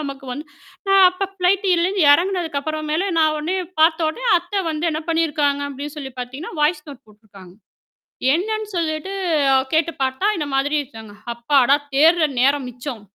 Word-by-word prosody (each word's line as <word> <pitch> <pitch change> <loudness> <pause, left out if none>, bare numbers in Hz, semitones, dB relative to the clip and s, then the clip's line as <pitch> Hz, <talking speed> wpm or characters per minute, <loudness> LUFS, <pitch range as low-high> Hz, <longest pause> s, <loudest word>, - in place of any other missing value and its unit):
நமக்கு 275 -2 -7
வந்து 295 +4 -7 0.6
அப்ப 385 +2 -3
ஃப்ளைட்டு 390 +2 +1
இதுலருந்து 360 0 +1
இறங்கினதுக்கு 340 -3 0
அப்புறம் 310 +1 -4
மேல 375 +5 0
நான் 310 -1 +3
உடனே 330 +5 -2 0.2
பார்த்தவுடனே 320 +7 +2
அத்தை 355 +3 -3
வந்து 310 +2 -2
என்ன 310 - -3
பண்ணிருக்காங்க, 295 -3 +1
அப்படின்னு 285 +2 -7
சொல்லி 270 -3 -7
பாத்தீங்கன்னா, 265 +8 -7
வாய்ஸ் 300 +1 +1
நோட்டு 275 -4 -11
போட்டுருக்காங்க. 200 -4 -17 0.8
என்னன்னு 435 +4 -2
சொல்லீட்டு 320 +3 -2 0.6
கேட்டுப் 320 -2 0
பார்த்தா, 265 +9 -1
இந்த 295 - -2
மாதிரி 285 +3 +1
இருக்காங்க. 225 -6 -12 0.2
அப்பாடா! 270 +3 +3 0.2
தேடுற 320 +2 +4
நேரம் 275 -1 +2
மிச்சம். 245 -2 -8
305 Hz, 145 wpm, -20 LUFS, 275-340 Hz, 0.8 s, தேடுற